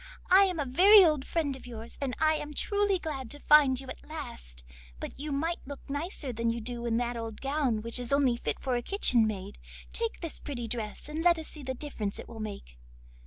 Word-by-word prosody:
I 390 Hz, +2 st, +8 dB
am 365 Hz, -4 st, -2 dB
a 290 Hz, -, 0 dB
very 375 Hz, +9 st, +8 dB
old 305 Hz, -4 st, +1 dB
friend 300 Hz, -5 st, 0 dB
of 260 Hz, -, -12 dB
yours, 230 Hz, -1 st, -9 dB
and 265 Hz, -3 st, -1 dB
I 315 Hz, 0 st, +4 dB
am 300 Hz, -1 st, -4 dB
truly 405 Hz, +2 st, +1 dB
glad 285 Hz, -8 st, -5 dB
to 290 Hz, -, -6 dB
find 285 Hz, -4 st, +6 dB
you 270 Hz, -, -9 dB
at -, -, -8 dB
last; -, -, -8 dB, 0.4 s
but -, -, -7 dB
you 300 Hz, +1 st, -4 dB
might 325 Hz, +5 st, -1 dB
look 285 Hz, -1 st, -9 dB
nicer 285 Hz, -2 st, -4 dB
than 230 Hz, +1 st, 0 dB
you 230 Hz, +1 st, -1 dB
do 240 Hz, +1 st, -5 dB
in 230 Hz, -1 st, +1 dB
that 240 Hz, 0 st, -1 dB
old 225 Hz, -2 st, -5 dB
gown, 270 Hz, -6 st, 0 dB
which 230 Hz, +2 st, -2 dB
is 245 Hz, 0 st, -3 dB
only 275 Hz, -3 st, +3 dB
fit -, -, -3 dB
for 260 Hz, -2 st, -1 dB
a 240 Hz, -, 0 dB
kitchen 240 Hz, -, +3 dB
maid. 200 Hz, -1 st, -5 dB, 0.3 s
Take 460 Hz, -1 st, -2 dB
this 330 Hz, -3 st, -5 dB
pretty 240 Hz, -5 st, -5 dB
dress 220 Hz, 0 st, -5 dB
and 305 Hz, +2 st, -4 dB
let 345 Hz, 0 st, +5 dB
us 320 Hz, -, -7 dB
see 305 Hz, -, -10 dB
the 260 Hz, -1 st, -4 dB
difference 225 Hz, -8 st, -4 dB
it -, -, -8 dB
will 225 Hz, -, -10 dB
make. 200 Hz, -, -7 dB
270 Hz, 230 wpm, -29 LUFS, 235-310 Hz, 0.4 s, I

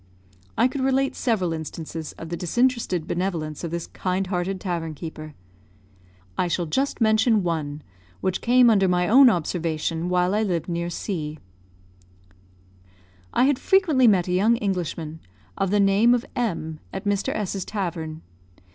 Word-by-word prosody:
I 245 Hz, -, +5 dB
could 265 Hz, +1 st, -4 dB
relate 270 Hz, +1 st, +1 dB
several 190 Hz, -9 st, 0 dB
instances 160 Hz, 0 st, -6 dB
of 165 Hz, -, -9 dB
the 170 Hz, -, -2 dB
disinterested 190 Hz, -2 st, 0 dB
benevolence 170 Hz, -4 st, -3 dB
of 170 Hz, -, -2 dB
this 170 Hz, 0 st, -4 dB
kind 185 Hz, +1 st, -2 dB
hearted 185 Hz, +1 st, -2 dB
tavern 170 Hz, -4 st, -3 dB
keeper. 155 Hz, -1 st, -8 dB, 1.0 s
I -, -, +2 dB
shall 175 Hz, 0 st, -1 dB
just 265 Hz, -, -1 dB
mention 220 Hz, -1 st, +3 dB
one, 155 Hz, -4 st, -3 dB, 0.4 s
which 185 Hz, -1 st, -1 dB
came 245 Hz, 0 st, +5 dB
under 195 Hz, -3 st, +4 dB
my 180 Hz, -1 st, +2 dB
own 260 Hz, +3 st, +8 dB
observation 165 Hz, -2 st, -1 dB
while 180 Hz, +1 st, +2 dB
I 210 Hz, -, +2 dB
lived 175 Hz, -7 st, -1 dB
near 170 Hz, 0 st, -2 dB
C. 155 Hz, -4 st, -4 dB, 1.9 s
I -, -, +2 dB
had 270 Hz, -1 st, +3 dB
frequently 320 Hz, -10 st, +4 dB
met 185 Hz, -5 st, +4 dB
a -, -, -2 dB
young 205 Hz, +6 st, +3 dB
Englishman, 170 Hz, -6 st, -3 dB, 0.4 s
of 195 Hz, -, 0 dB
the 205 Hz, +2 st, +2 dB
name 200 Hz, +5 st, +5 dB
of 245 Hz, -, -3 dB
M, 165 Hz, -10 st, -2 dB
at 190 Hz, -, -6 dB
Mr. 205 Hz, -1 st, 0 dB
S 205 Hz, -2 st, -2 dB
's 195 Hz, -, -3 dB
tavern. 165 Hz, -6 st, -4 dB
180 Hz, 155 wpm, -24 LUFS, 165-220 Hz, 1.9 s, own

